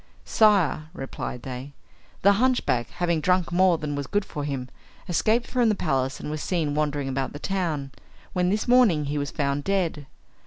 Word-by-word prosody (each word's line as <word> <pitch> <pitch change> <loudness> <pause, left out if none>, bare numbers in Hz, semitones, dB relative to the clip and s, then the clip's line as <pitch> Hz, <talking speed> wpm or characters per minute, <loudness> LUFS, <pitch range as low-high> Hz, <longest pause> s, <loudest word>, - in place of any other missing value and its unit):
"Sire," 185 - +3
replied 135 -3 -6
they, 130 +2 -7 0.5
"the 200 - +7
hunchback 245 - +1
having 170 -2 -1
drunk 180 +1 +1
more 180 -1 +4
than 150 -2 -4
was 145 -1 -3
good 205 +5 0
for 145 - -5
him, 135 -3 -3 0.4
escaped 220 +7 +2
from 245 -3 +2
the 210 - +2
palace 135 -7 -1
and 150 - -5
was 155 0 -4
seen 160 -5 -1
wandering 145 -2 -1
about 135 0 -2
the - - -6
town, 155 -6 -2 0.4
where 180 -1 +1
this 210 +5 0
morning 235 -12 +4
he 145 +1 -2
was 145 0 -2
found 140 -2 -1
dead. 170 -7 -1
155 Hz, 180 wpm, -25 LUFS, 140-190 Hz, 0.5 s, the